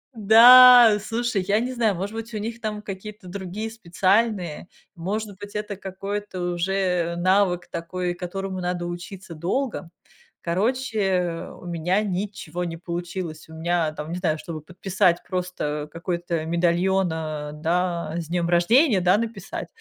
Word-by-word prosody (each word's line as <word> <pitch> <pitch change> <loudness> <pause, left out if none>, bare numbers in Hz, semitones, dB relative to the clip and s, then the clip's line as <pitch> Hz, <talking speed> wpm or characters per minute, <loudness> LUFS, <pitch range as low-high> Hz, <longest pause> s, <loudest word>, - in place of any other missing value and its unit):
Да, 235 +1 +9
слушай, 230 -3 -1
я 205 +1 +3
не 250 +3 -2
знаю, 225 -5 +1
может 200 +5 -4
быть, 225 +1 -6
у - - -2
них 230 +2 -5
там 210 -1 -3
какие-то 205 0 -8
другие 195 +3 -5
специальные, 195 -4 0 0.3
может 200 +4 -4
быть, 205 0 -10
это 210 -1 -3
какой-то 195 0 -5
уже 180 -1 0
навык 185 0 +2
такой, 175 +1 -3
которому 190 +2 -5
надо 180 -1 -2
учиться 175 0 -8
долго. 190 - -2 0.5
Короче, 190 -3 -1
у - - -12
меня 175 +4 0
ничего 185 -4 -4
не 165 -1 -5
получилось. 170 -1 -5
У - - -11
меня 165 0 0
там, 155 +1 -7
не 175 - -3
знаю, 160 -4 0
чтобы 165 -4 -7
подписать 180 +1 0
просто, 180 -5 -3
какой-то 170 -1 -3
медальон, 175 +3 +2
э, 155 -2 -4
да, 170 0 -1
"С 165 -2 -4
днём 170 0 -1
рождения!", 205 - +4
Да, 180 +3 +4
написать, 220 -4 -5
185 Hz, 140 wpm, -24 LUFS, 170-210 Hz, 0.5 s, Да